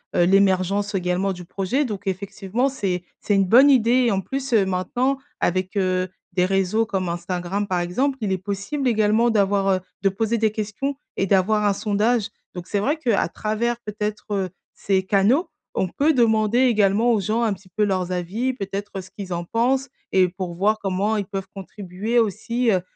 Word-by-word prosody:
heu, 175 - +4
l'émergence 195 +1 +2
également 185 +1 0
du 180 -1 -10
projet 200 +11 -1
donc 205 -4 -6
effectivement 200 +5 -1
c'est 195 -10 -2 0.2
c'est 205 - 0
une 195 -1 +3
bonne 250 +9 +7
idée, 250 -1 +4
et - - +2
en 195 -1 0
plus, 270 +4 -4
heu, 210 -4 +4
maintenant 240 +9 -1 0.2
avec, 185 +3 -1
heu, 185 -1 +1 0.2
des 180 0 +2
réseaux 195 +4 +1
comme 190 -4 -2
Instagram 175 +3 -3
par 180 -2 0
exemple, 255 +11 0
il 205 -3 -1
est 190 - 0
possible 200 +9 -3
également 220 0 +3
d'avoir, 200 -2 +2
heu 190 -1 +3 0.2
de 195 - +3
poser 225 +4 -1
des 220 -1 +2
questions 215 +6 -3 0.2
et 195 - 0
d'avoir 210 +3 +2
un 205 - +3
sondage. 215 +2 0 0.3
Donc 175 -1 -6
c'est 205 - -1
vrai 285 +10 0
qu'à 240 -9 +1
travers 230 +3 -2
peut-être, 210 0 -4
heu, 195 -2 -1 0.2
ces 190 -1 0
canaux, 210 - +2 0.3
on 190 - +1
peut 290 - +2
demander 225 -2 +3
également 225 -2 +3
aux 220 - +2
gens 215 +4 0
un 230 -2 +2
petit 190 0 -14
peu 215 - +2
leurs 185 -3 0
avis, 195 +9 -1
peut-être 195 -3 -5
ce 185 - -14
qu'ils 190 -3 -7
en 170 0 -3
pensent 250 +8 0 0.2
et 185 -1 +4
pour 180 -1 -5
voir 210 +5 +2
comment 200 +2 0
ils 205 - -2
peuvent 195 -1 -5
contribuer 195 +3 -4
aussi, 230 +3 0
heu, 185 -3 +2
200 Hz, 190 wpm, -23 LUFS, 190-230 Hz, 0.3 s, bonne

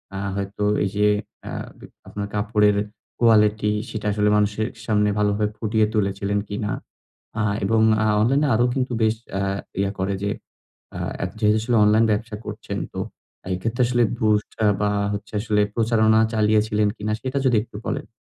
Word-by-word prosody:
আ - - -3 0.2
হয়তো 100 +1 -4 0.2
এই 100 - 0
যে 105 0 +4 0.4
আ - - -6 0.3
বি - - -11 0.2
আপনার 100 0 -5
কাপড়ের 105 0 +2 0.4
কোয়ালিটি 105 -2 +4 0.2
সেটা 110 -2 -6
আসলে 105 0 +2
মানুষের 105 +2 +1 0.2
সামনে 105 -2 +2
ভালোভাবে 105 0 +1
ফুটিয়ে 110 -1 +1
তুলেছিলেন 100 -1 0
কিনা? 105 0 -3 0.7
আ - - +2 0.2
এবং 110 +2 +2 0.2
অ্যা 110 - +2
অনলাইনে 135 +7 +3
আরো 120 - +3
কিন্তু 130 -1 -1
বেশ 110 0 +3 0.2
আ - - 0 0.4
ইয়ে 100 0 +1
করে 95 +1 0
যে 100 - 0 0.7
আ - - -4 0.2
এত 90 - -3
যেহেতু 105 0 +3
আসলে 120 +1 +1
অনলাইন 110 +2 +4
ব্যবসা 105 +1 -2
করছেন - - -5 0.2
তো - - -5 0.5
এক্ষেত্রে 115 +7 -1
আসলে 120 -1 +2 0.2
boost 105 -1 +1
আ - - +5
বা 105 - +2 0.2
হচ্ছে 105 +1 -7
আসলে 105 -1 +1
প্রচারণা 110 -1 +3
চালিয়েছিলেন 105 -1 +2
কিনা? 105 +1 -3
সেটা 130 +1 -3
যদি 125 -3 +4
একটু 105 - -11
বলেন। - - -3
105 Hz, 165 wpm, -23 LUFS, 105-110 Hz, 0.7 s, আ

